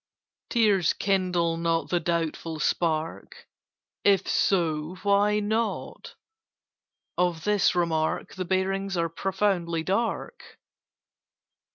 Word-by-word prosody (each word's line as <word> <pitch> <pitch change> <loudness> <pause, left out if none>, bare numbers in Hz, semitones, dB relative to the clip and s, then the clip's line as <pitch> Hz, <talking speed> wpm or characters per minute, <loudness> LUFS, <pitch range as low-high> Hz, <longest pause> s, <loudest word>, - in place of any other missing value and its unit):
"Tears 205 -7 +3
kindle 180 -4 0
not 165 0 0
the 175 - +2
doubtful 165 -1 -2
spark. 160 0 -2 0.6
If 200 -1 +3
so, 165 -3 +1
why 205 +1 +3
not? 220 +2 -3 1.0
Of 175 -3 +1
this 210 -3 +2
remark 160 -2 0
The 185 -1 -4
bearings 195 +1 -1
are 165 0 0
profoundly 180 -2 -1
dark." 230 - -3
180 Hz, 90 wpm, -26 LUFS, 165-200 Hz, 1.0 s, Tears